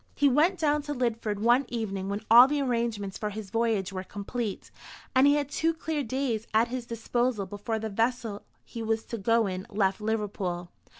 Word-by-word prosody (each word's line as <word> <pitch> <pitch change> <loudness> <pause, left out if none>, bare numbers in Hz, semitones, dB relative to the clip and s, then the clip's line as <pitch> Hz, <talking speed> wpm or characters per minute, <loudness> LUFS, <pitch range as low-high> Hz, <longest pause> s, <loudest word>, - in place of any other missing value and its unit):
He 285 - +4
went 310 +8 +3
down 300 -2 +2
to 290 0 -5
Lidford 230 -4 -1
one 240 +6 +3
evening 195 -5 -3
when 205 +2 -3
all 240 +3 +10
the 295 +1 0
arrangements 230 -7 -1
for 210 - -2
his 210 -2 -7
voyage 220 -4 0
were 185 0 -4
complete, 205 +2 -5 0.4
and 265 +2 +6
he 285 - +5
had 290 -2 0
two 320 +3 0
clear 320 -2 -2
days 245 -3 -2
at 225 +2 +4
his 245 -1 -4
disposal 230 -1 -1
before 205 +4 -4
the 220 0 -3
vessel 225 0 -1 0.2
he 230 - -7
was 225 0 -1
to 230 - -6
go 230 +2 +3
in 185 -1 -4
left 200 -1 0
Liverpool. 200 -5 -2
230 Hz, 190 wpm, -28 LUFS, 205-255 Hz, 0.4 s, all